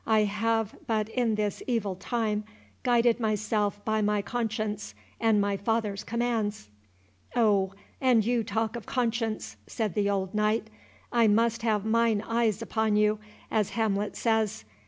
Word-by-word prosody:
"I 220 -1 +4
have 220 +1 0
but 220 -1 0
in 230 -2 +1
this 210 -1 -2
evil 225 -6 0
time, 215 +1 -1 0.4
guided 240 -1 +3
myself 210 -2 0
by 220 0 +1
my 210 -1 +1
conscience, 215 -2 -3 0.2
and 225 -2 +3
my 200 0 +1
father's 210 -1 -1
commands." 225 - -1 0.7
"O, 200 -5 +3 0.3
and 245 -5 +4
you 240 -1 +1
talk 220 +2 -1
of 235 - -7
conscience," 225 - -1
said 215 -5 -2
the 200 +1 +1
old 190 -2 -1
knight, 215 +1 +1 0.4
"I 235 -2 +4
must 230 +2 +2
have 215 -3 +1
mine 225 -1 +2
eye 230 0 +2
upon 220 -2 0
you, 210 0 +3 0.3
as 215 -3 +1
Hamlet 210 -2 0
says. 220 - 0
220 Hz, 145 wpm, -28 LUFS, 210-230 Hz, 0.7 s, I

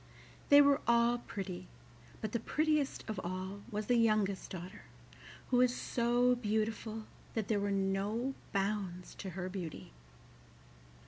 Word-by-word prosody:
They 285 0 +9
were 280 +1 +4
all 235 0 +4
pretty, 190 - -6 0.5
but 215 - -3
the 235 - 0
prettiest 305 +3 0
of 215 -3 -3
all 185 +3 -4
was 210 -1 -3
the 245 +2 +3
youngest 215 -4 +2
daughter, 185 +2 -8 0.7
who 250 - +4
was 250 0 +4
so 245 +1 +2
beautiful 220 -1 -1 0.3
that 220 -3 -1
there 215 -2 +2
were 200 0 0
no 200 +6 0 0.2
bounds 195 -3 -2
to 195 - -4
her 180 -1 -2
beauty. 180 - -6
215 Hz, 135 wpm, -34 LUFS, 195-240 Hz, 0.7 s, They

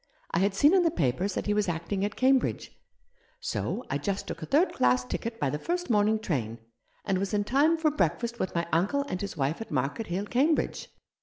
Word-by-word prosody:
I 170 - +1
had 195 +1 +1
seen 290 - +5
in 380 - +5
the 340 - +3
papers 175 - -1
that - - -2
he 210 - +1
was 210 -2 +1
acting 170 +4 -2
at 205 +1 -2
Cambridge, 260 0 +2 0.7
so 250 - -3
I 140 - -2
just 195 +7 -2
took - - -6
a 160 - -5
third 325 +7 +3
class 125 0 +2
ticket 230 - -4
by 135 - 0
the 150 - -3
first 350 - -2
morning 210 0 +3
train, 130 - -3 0.5
and 195 -2 +1
was 200 +2 -1
in 205 - +1
time 290 +9 +3
for 315 -1 +2
breakfast 235 - -1
with 185 - -2
my 170 0 0
uncle 200 - +2
and 185 - -4
his 200 -4 -5
wife 145 +7 -1
at 225 - -7
Market 140 - -2
Hill, 185 +4 -2
Cambridge. 275 +9 0
205 Hz, 220 wpm, -28 LUFS, 170-255 Hz, 0.7 s, seen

